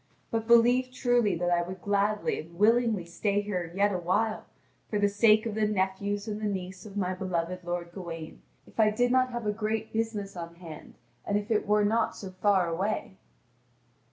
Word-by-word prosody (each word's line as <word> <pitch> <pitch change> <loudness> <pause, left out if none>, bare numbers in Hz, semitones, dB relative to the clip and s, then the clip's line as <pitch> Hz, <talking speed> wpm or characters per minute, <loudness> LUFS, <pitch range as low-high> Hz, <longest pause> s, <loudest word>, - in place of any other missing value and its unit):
But 225 -1 -1
believe 245 +2 +5
truly 245 -6 +2
that 175 +1 -1
I 175 0 +3
would 180 +1 -7
gladly 205 +1 +1
and 165 +2 -10
willingly 220 -2 +3
stay 200 +4 0
here 180 -5 -3
yet 200 +1 +2
awhile 185 +5 0 0.4
for 210 - -1
the 205 0 +3
sake 215 +2 +4
of 225 - -2
the 215 0 +1
nephews 200 +1 -1
and 210 0 -4
the 210 - 0
niece 190 0 -5
of 205 -1 -9
my 185 -2 0
beloved 180 -1 -3
lord 175 0 -4
Gawain, 170 -3 -8 0.2
if - - -16
I 215 -1 +6
did 245 +3 +1
not 255 0 +3
have 240 -2 -4
a 210 - +2
great 220 +1 -3
business 220 -3 -2
on 170 -1 -7
hand, 165 -3 -11 0.3
and 205 - 0
if 205 +2 -4
it 215 - +1
were 210 0 +3
not 225 +2 +1
so 190 -2 -8
far 185 -1 +2
away." 190 +3 -2
205 Hz, 190 wpm, -28 LUFS, 180-220 Hz, 0.4 s, I